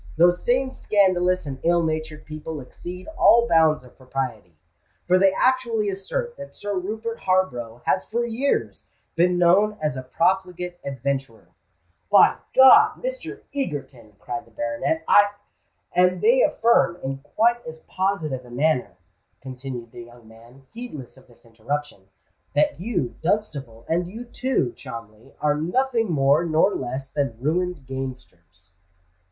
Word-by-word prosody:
Those 175 Hz, +1 st, +4 dB
same 260 Hz, +2 st, +1 dB
scandalous 185 Hz, -6 st, +2 dB
and 135 Hz, -2 st, -6 dB
ill 170 Hz, 0 st, +2 dB
natured 155 Hz, -1 st, -3 dB
people 155 Hz, 0 st, -6 dB
exceed 175 Hz, +7 st, -9 dB
all 235 Hz, -6 st, +6 dB
bounds 160 Hz, -, +4 dB
of 125 Hz, -, -17 dB
propriety; 125 Hz, -, -5 dB, 0.5 s
for 185 Hz, +1 st, +4 dB
they 195 Hz, 0 st, +5 dB
actually 235 Hz, -1 st, +1 dB
assert 475 Hz, -, -4 dB
that 280 Hz, -, -10 dB
Sir 205 Hz, 0 st, -4 dB
Rupert 220 Hz, +5 st, -4 dB
Harborough 125 Hz, -12 st, -1 dB
has 185 Hz, -, +1 dB
for 235 Hz, +2 st, -2 dB
years 240 Hz, +5 st, -2 dB, 0.3 s
been 175 Hz, +2 st, +3 dB
known 195 Hz, +5 st, +4 dB
as 150 Hz, -3 st, -1 dB
a 130 Hz, -, -4 dB
profligate 180 Hz, +4 st, -1 dB
adventurer——" 135 Hz, -3 st, -4 dB, 0.6 s
"By -, -, +6 dB, 0.2 s
God, 420 Hz, -, +7 dB
Mr. -, -, -5 dB
Egerton!" 135 Hz, -, -5 dB
cried 145 Hz, +6 st, -6 dB
the -, -, -19 dB
baronet: 295 Hz, +2 st, -2 dB
"I——" 205 Hz, 0 st, +5 dB, 0.6 s
"And 180 Hz, +1 st, +3 dB
they -, -, +4 dB
affirm 225 Hz, -, +3 dB
in 135 Hz, 0 st, -3 dB
quite 235 Hz, -, +1 dB
as 160 Hz, 0 st, -9 dB
positive 175 Hz, -9 st, -2 dB
a 125 Hz, -, -15 dB
manner," 130 Hz, -, 0 dB, 0.4 s
continued 125 Hz, -3 st, -8 dB
the 120 Hz, -, -10 dB
young 120 Hz, -1 st, -17 dB
man, 120 Hz, +4 st, -17 dB
heedless 225 Hz, -, -8 dB
of 130 Hz, -, -19 dB
this 120 Hz, 0 st, -23 dB
interruption, 115 Hz, -1 st, -5 dB, 0.5 s
"that 150 Hz, +2 st, +2 dB
you, 170 Hz, -, -2 dB
Dunstable, 145 Hz, -, -2 dB
and 175 Hz, +2 st, 0 dB
you 225 Hz, +6 st, -8 dB
too, 245 Hz, -, -1 dB
Cholmondeley, 115 Hz, +2 st, -10 dB
are 150 Hz, -1 st, +3 dB
nothing 230 Hz, +3 st, 0 dB
more 145 Hz, +1 st, +3 dB
nor 165 Hz, +4 st, +2 dB
less 130 Hz, +1 st, -4 dB
than 135 Hz, -5 st, -2 dB
ruined 170 Hz, +2 st, -1 dB
gamesters." 125 Hz, -, -8 dB
160 Hz, 140 wpm, -23 LUFS, 130-205 Hz, 0.6 s, God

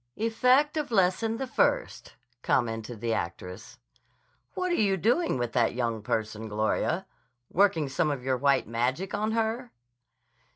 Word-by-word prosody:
"Effect 255 Hz, +7 st, +2 dB
of 300 Hz, -1 st, -2 dB
Lesson 220 Hz, +2 st, +2 dB
the 265 Hz, -, -3 dB
First," -, -, 0 dB, 0.3 s
commented 115 Hz, -3 st, -1 dB
the 115 Hz, -1 st, 0 dB
actress. 90 Hz, +2 st, -5 dB, 0.8 s
"What 365 Hz, -1 st, -1 dB
are -, -, +2 dB
you 200 Hz, -, +2 dB
doing 240 Hz, -, +1 dB
with 120 Hz, -1 st, -2 dB
that 120 Hz, -2 st, +2 dB
young 115 Hz, -3 st, -1 dB
person, 110 Hz, +1 st, -3 dB
Gloria? 110 Hz, 0 st, 0 dB, 0.5 s
Working 170 Hz, -6 st, +3 dB
some 135 Hz, +4 st, 0 dB
of 140 Hz, -4 st, -3 dB
your 130 Hz, 0 st, 0 dB
white 140 Hz, -2 st, +2 dB
magic 125 Hz, -, -1 dB
on 215 Hz, +2 st, -1 dB
her?" 230 Hz, +2 st, -1 dB
150 Hz, 140 wpm, -28 LUFS, -, 0.8 s, Working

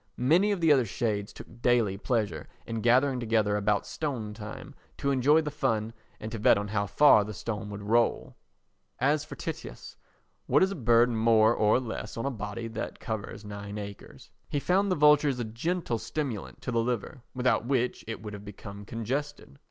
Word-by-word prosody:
Many 170 Hz, +12 st, +3 dB
of 195 Hz, -4 st, -1 dB
the 160 Hz, -2 st, +6 dB
other 130 Hz, -5 st, +2 dB
shades 105 Hz, 0 st, -2 dB
took 120 Hz, +1 st, -13 dB
daily 120 Hz, -6 st, +2 dB
pleasure 105 Hz, -, -2 dB, 0.2 s
in 115 Hz, -1 st, -4 dB
gathering 130 Hz, +3 st, +3 dB
together 110 Hz, -3 st, +1 dB
about 105 Hz, 0 st, +1 dB
stone 125 Hz, -9 st, -4 dB
time 105 Hz, 0 st, -9 dB, 0.2 s
to 140 Hz, -, 0 dB
enjoy 140 Hz, +4 st, +4 dB
the 150 Hz, -1 st, -4 dB
fun 115 Hz, -7 st, -1 dB, 0.3 s
and 110 Hz, +1 st, -6 dB
to 115 Hz, -, -4 dB
bet -, -, +5 dB
on 105 Hz, 0 st, -3 dB
how 100 Hz, -1 st, -1 dB
far 110 Hz, 0 st, +6 dB
the 105 Hz, 0 st, -7 dB
stone 105 Hz, 0 st, -4 dB
would 100 Hz, 0 st, -7 dB
roll. 115 Hz, +3 st, +1 dB, 0.6 s
As 145 Hz, +3 st, +2 dB
for 155 Hz, -, -9 dB
Tityus—what 165 Hz, +3 st, -4 dB
is 190 Hz, -, +2 dB
a -, -, -3 dB
bird 120 Hz, -2 st, +4 dB
more 110 Hz, 0 st, +4 dB
or 110 Hz, +1 st, +3 dB
less 110 Hz, -3 st, -6 dB
on 115 Hz, -, -3 dB
a 140 Hz, -, 0 dB
body 110 Hz, 0 st, -5 dB
that 110 Hz, +1 st, -5 dB
covers 110 Hz, -2 st, -5 dB
nine 100 Hz, 0 st, -7 dB
acres? 100 Hz, -1 st, -9 dB, 0.2 s
He 145 Hz, -, 0 dB
found 190 Hz, +6 st, +1 dB
the -, -, +3 dB
vultures 150 Hz, -3 st, +4 dB
a 120 Hz, -, -2 dB
gentle 120 Hz, +3 st, -2 dB
stimulant 115 Hz, -2 st, -5 dB
to 125 Hz, -, -3 dB
the 115 Hz, -1 st, +2 dB
liver 120 Hz, +1 st, -3 dB
without 125 Hz, -2 st, +1 dB
which 125 Hz, -2 st, 0 dB
it 115 Hz, -1 st, -6 dB
would 105 Hz, -1 st, -6 dB
have 100 Hz, 0 st, -8 dB
become 100 Hz, 0 st, -9 dB
congested. 125 Hz, -, -4 dB
115 Hz, 185 wpm, -28 LUFS, 105-135 Hz, 0.6 s, the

